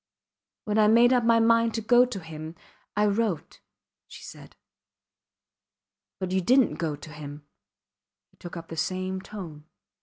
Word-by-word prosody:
When 210 0 0
I 210 - +5
made 235 +3 +5
up 245 -2 +2
my 230 0 +4
mind 230 0 +3
to 225 - -2
go 245 +3 +5
to 245 -6 -6
him 160 0 -9 0.4
I 210 - +3
wrote, 205 -6 -1 0.5
she - - -12
said. - - -12 1.6
But 185 -1 -4
you 190 0 +1
didnt 255 +6 +3
go 160 -3 -2
to 150 +2 -12
him, 145 0 -9 0.9
he - - -31
took 175 0 -9
up 165 0 -10
in - - -4
the - - -8
same 185 +3 -2
tone. 170 -8 -9
190 Hz, 160 wpm, -26 LUFS, 160-230 Hz, 1.6 s, I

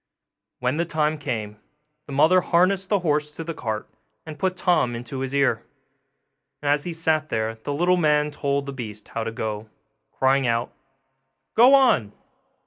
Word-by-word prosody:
When 125 +4 -1
the 170 - +1
time 155 -2 0
came 110 -7 -4 0.5
the - - -9
mother 160 +7 +4
harnessed 185 +3 +2
the 205 - +3
horse 150 -2 0
to 165 - -5
the 165 +1 -5
cart, 110 -7 -4 0.4
and 155 -2 -9
put 185 -1 -1
Tom 150 -10 +2
into 120 +3 -6
his 130 0 -3
ear; 140 -5 +1 1.0
and 145 0 0
as 145 0 +1
he 175 - -3
sat 160 -2 0
there 110 0 -1
the - - -2
little 180 +4 +3
man 150 -2 +2
told 140 -1 -1
the 140 - -6
beast 105 -5 -8
how 115 - -3
to 115 - -3
go, 110 -1 -5 0.4
crying 135 0 +2
out, 115 0 -1 0.8
'Go 250 +4 +7
on! 225 - +3
145 Hz, 170 wpm, -24 LUFS, 120-165 Hz, 1.0 s, Go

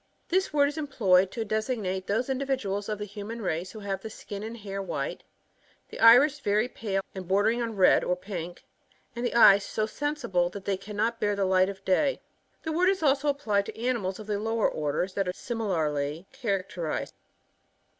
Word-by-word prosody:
This 375 +2 +1
word 285 -1 +4
is 290 +2 -4
employed 195 -11 +3
to 225 -2 -3
designate 215 -4 -2
those 225 +5 0
indi 265 0 -1
viduals 205 -7 -2
ofthe 210 -1 -3
human 210 +3 -7
race 180 -3 -2
who 215 - -9
have 195 -1 -3
the 220 - -6
skin 200 -1 -8
and 225 +2 -6
hair 195 -2 -5
white, 195 - -4 0.7
the - - -9
iris 250 +6 +7
very 215 -2 +1
pale 195 -5 -3
and 190 -2 -7
bordering 210 +5 +2
on 230 -2 -3
red 190 -2 +5
or 180 - +1
pink; 180 -2 -7 0.5
and 235 - -4
the 240 - -1
eyes 200 -4 +8
so 215 - -1
sensible, 220 -10 -1
that 195 +1 -9
they 200 - +1
cannot 215 +4 -2
bear 205 -2 +1
the 200 -1 0
light 185 0 +3
of 195 -1 -9
day. 270 +9 +2 0.4
The 315 - -2
word 355 +4 +3
is 385 -3 0
also 280 0 +2
applied 215 -9 +1
to - - -8
animals 230 -6 -1
ofthe 210 -1 -3
lower 225 0 +1
orders 155 +5 -2
that; 195 -2 -1
are 180 - -1
similarly 165 - -2
characterised. 195 - -3
210 Hz, 185 wpm, -27 LUFS, 190-240 Hz, 0.7 s, eyes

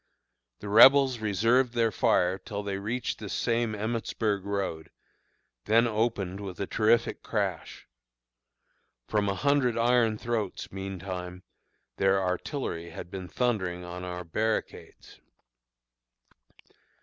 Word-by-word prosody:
The 105 - -7
Rebels 130 +4 +7
reserved 115 +4 +2
their 115 -1 +2
fire 90 -1 +2
till 105 -2 -6
they 100 -1 -3
reached 115 +5 -3
this 105 -2 -6
same 115 -2 0
Emmitsburg 110 -2 -2
road, 100 -6 -3 0.8
then 115 +2 +4
opened 105 -4 -1
with 95 -3 -7
a 100 - -1
terrific 110 +3 +1
crash. - - -3 1.2
From 105 -2 +1
a 100 - -1
hundred 140 -1 +2
iron 115 -2 +3
throats, 110 -4 -3
meantime, 95 -1 -6 0.5
their 95 0 +3
artillery 90 - -3
had 85 +2 -9
been 95 -2 -6
thundering 95 -7 -1
on 90 +1 -7
our 90 0 -5
barricades. 110 +6 -4
105 Hz, 115 wpm, -28 LUFS, 95-115 Hz, 1.2 s, Rebels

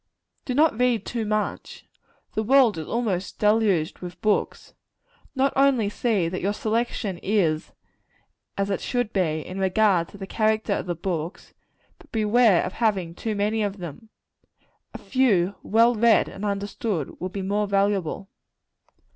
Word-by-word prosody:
Do 250 - -2
not 300 -5 +3
read 245 -4 +2
too 230 -2 -3
much. 215 0 -3 0.5
The 215 - 0
world 235 -4 +4
is 155 - -6
almost 205 -6 -2
deluged 210 -6 +2
with 180 0 -8
books. 210 +1 -1 0.6
Not 270 +1 +2
only 265 -6 +3
see 210 -7 0
that 185 +2 -4
your 200 +3 0
selection 215 -4 -2
is 175 -6 0 0.9
as 200 0 -1
it 195 - -1
should 245 -4 -2
be, 160 -5 0
in 185 +1 -6
regard 190 -2 +2
to 205 - -13
the 195 - -6
character 215 0 0
of - - -3
the 175 - -2
books, 170 0 -5 0.5
but - - -20
beware 220 -3 +3
of 185 - -4
having 195 -7 0
too 215 +4 -4
many 210 +2 0
of 205 -1 -2
them. 180 +4 -9 0.8
A - - -7
few, 200 -9 +1
well 230 +3 +4
read 230 0 +4
and 195 - -9
understood, 200 - -3
will 185 - -2
be 195 +1 -5
more 205 +2 0
valuable. 195 -2 0
205 Hz, 155 wpm, -24 LUFS, 185-225 Hz, 0.9 s, world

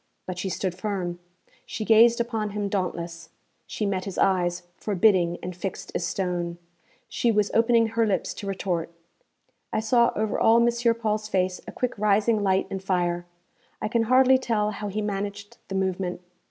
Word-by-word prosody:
But 180 -1 -5
she 190 - -2
stood 185 -1 -2
firm; 180 -2 -3 0.4
she 220 - -5
gazed 230 +2 +6
upon 225 -3 -1
him 205 -1 -1
dauntless; 170 -3 -3 0.4
she 215 - -3
met 190 -2 -1
his 195 -3 -6
eyes, 180 -2 +1
forbidding 185 -4 +2
and 180 0 -5
fixed 190 +2 -5
as - - -2
stone. 175 -2 -2 0.5
She 235 - +1
was 210 -2 +1
opening 230 0 +4
her 225 0 +1
lips 200 - -1
to 200 - -7
retort. 185 -4 -2 0.8
I - - 0
saw 235 +2 +3
over 215 0 -1
all 225 +1 +5
M. 235 0 +2
Paul's 215 -2 -1
face 185 -2 0
a - - -6
quick 250 - -2
rising 210 +1 +3
light 190 -1 +2
and 195 - -3
fire. 175 -2 -1 0.5
I - - -2
can 230 -1 +1
hardly 260 +2 +5
tell 215 -4 0
how 210 0 -5
he 210 +2 -3
managed 200 0 -4
the 195 - -5
movement. 185 -2 -1
200 Hz, 170 wpm, -25 LUFS, 185-225 Hz, 0.8 s, gazed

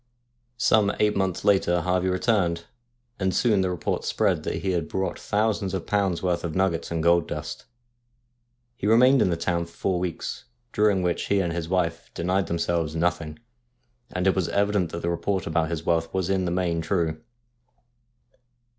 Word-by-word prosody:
Some 105 -3 +3
eight 105 0 +2
months 95 -2 -1
later 90 -3 +3
Harvey 90 +1 +1
returned, 90 -4 +1 0.5
and 95 -2 0
soon 110 -5 +3
the 95 - 0
report 90 -3 -2
spread - - +1
that - - -4
he 95 - +1
had 85 -3 -1
brought 95 0 -2
thousands 105 -2 0
of 90 - -4
pounds' 100 -4 0
Worth 90 -2 0
of 85 -3 -4
nuggets 95 -3 0
and 80 -1 -2
gold 85 0 +4
dust. - - -6 1.1
He 105 - -3
remained 125 +4 +6
in - - +3
the 85 - 0
town 85 0 -1
for 85 - -19
four 95 -2 -1
weeks, 90 -2 -4 0.3
during 105 -3 +2
which 90 -1 -1
he 100 - +2
and 85 -3 -1
his 85 -1 -4
wife 85 -3 -1
denied 95 +3 0
them 85 - -1
selves 85 -2 -1
nothing, 85 -2 -1 0.7
and 90 0 -2
it 95 - +3
was 95 -3 0
evident 100 -3 +1
that 85 - -5
the 85 - 0
report 95 +1 -1
about 80 0 0
his 80 -1 -4
wealth 80 -1 +1
was 95 0 -1
in 95 -1 +1
the 85 - -1
main 85 -2 0
true. 80 -2 -1
90 Hz, 180 wpm, -25 LUFS, 85-95 Hz, 1.1 s, remained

